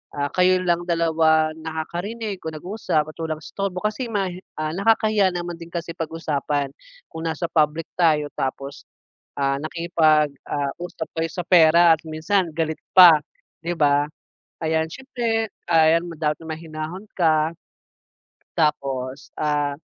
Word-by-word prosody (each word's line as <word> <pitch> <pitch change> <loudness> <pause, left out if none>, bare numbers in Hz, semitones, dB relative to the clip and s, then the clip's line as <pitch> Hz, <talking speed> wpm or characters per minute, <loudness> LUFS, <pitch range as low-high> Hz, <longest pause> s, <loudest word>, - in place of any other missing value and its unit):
ah, 145 -1 -2
kayo 185 0 +4
lang 175 -1 +1
dalawa 160 -2 +3
nakakarinig 175 +7 -5
o - - -1
nag-uusap 160 -2 -1
at - - -27
walang 160 -1 -2
istorbo. 195 +1 -4
Kasi 225 +4 -1
mahi 190 -4 -2 0.2
ah, 155 0 -2
nakakahiya 215 0 +3
naman 175 -1 -5
din 165 - -9
kasi 170 0 -4
pag-usapan, 150 -4 -2 0.4
kung 165 0 -5
nasa 160 +2 -2
public 155 0 +2
tayo, 150 -3 +3
tapos, 135 +1 -4 0.6
ah, 135 0 +1
nakikipag, 155 -2 +2 0.2
ah, 140 -1 -1
usap 170 -2 -6
kayo 165 0 -1
sa 180 - -4
pera 170 -1 +6
at - - -20
minsan 165 +4 0
galit 160 0 -2
pa, 175 -5 +9 0.4
'di 170 - -1
ba. 145 -1 +4 0.6
Ayan, 160 0 +1
siyempre, 230 -5 -2 0.2
ayan 165 0 +5
ma 170 - -7
dapat 150 -1 0
na 160 - -10
mahinahon 160 +4 -7
ka 160 -2 +3 1.0
tapos, 135 -4 -1
ah, 145 -1 0
160 Hz, 140 wpm, -23 LUFS, 155-180 Hz, 1.0 s, pa